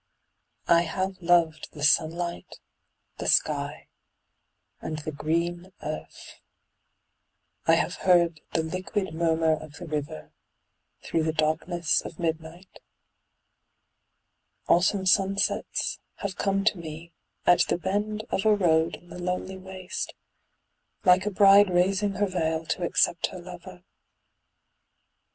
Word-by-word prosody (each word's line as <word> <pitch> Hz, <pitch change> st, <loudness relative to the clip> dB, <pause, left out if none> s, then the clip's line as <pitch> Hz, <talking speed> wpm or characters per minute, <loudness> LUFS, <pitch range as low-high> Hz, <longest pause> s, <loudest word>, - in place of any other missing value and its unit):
I 170 Hz, 0 st, +5 dB
have 185 Hz, +3 st, -3 dB
loved 165 Hz, -3 st, +2 dB
the 145 Hz, -, -7 dB
sunlight, 165 Hz, +3 st, +1 dB, 0.6 s
the -, -, -4 dB
sky -, -, +1 dB, 0.9 s
and 155 Hz, -, -4 dB
the 155 Hz, +1 st, -5 dB
green 170 Hz, +5 st, -2 dB
earth; -, -, -8 dB, 1.3 s
I -, -, +6 dB
have -, -, -1 dB
heard 170 Hz, -4 st, +3 dB
the 160 Hz, -, +1 dB
liquid 185 Hz, +2 st, -3 dB
murmur 160 Hz, -1 st, +2 dB
of 155 Hz, -1 st, -6 dB
the 175 Hz, -, -9 dB
river 145 Hz, -, -5 dB, 0.7 s
through 165 Hz, -, 0 dB
the 160 Hz, 0 st, 0 dB
darkness 160 Hz, +2 st, 0 dB
of 160 Hz, -, -9 dB
midnight; 165 Hz, +2 st, -5 dB, 1.9 s
Autumn 190 Hz, +3 st, +3 dB
sunsets 195 Hz, +1 st, +1 dB, 0.2 s
have 195 Hz, -2 st, -5 dB
come 195 Hz, +1 st, 0 dB
to 210 Hz, -3 st, +1 dB
me 165 Hz, +1 st, -9 dB, 0.3 s
at 175 Hz, -, +5 dB
the -, -, 0 dB
bend 205 Hz, +4 st, -2 dB
of 195 Hz, -, 0 dB
a 215 Hz, -1 st, +5 dB
road 165 Hz, -4 st, +2 dB
in 175 Hz, -, -18 dB
the 180 Hz, -, -9 dB
lonely 180 Hz, +1 st, -3 dB
waste, 185 Hz, -1 st, -6 dB, 0.9 s
like 185 Hz, +2 st, +5 dB
a -, -, +3 dB
bride 200 Hz, 0 st, +6 dB
raising 195 Hz, +3 st, +1 dB
her 205 Hz, +1 st, +1 dB
veil 165 Hz, -4 st, -1 dB
to 170 Hz, -, -2 dB
accept 170 Hz, 0 st, +2 dB
her 185 Hz, -, -9 dB
lover. 180 Hz, 0 st, -11 dB
175 Hz, 120 wpm, -26 LUFS, 160-190 Hz, 1.9 s, I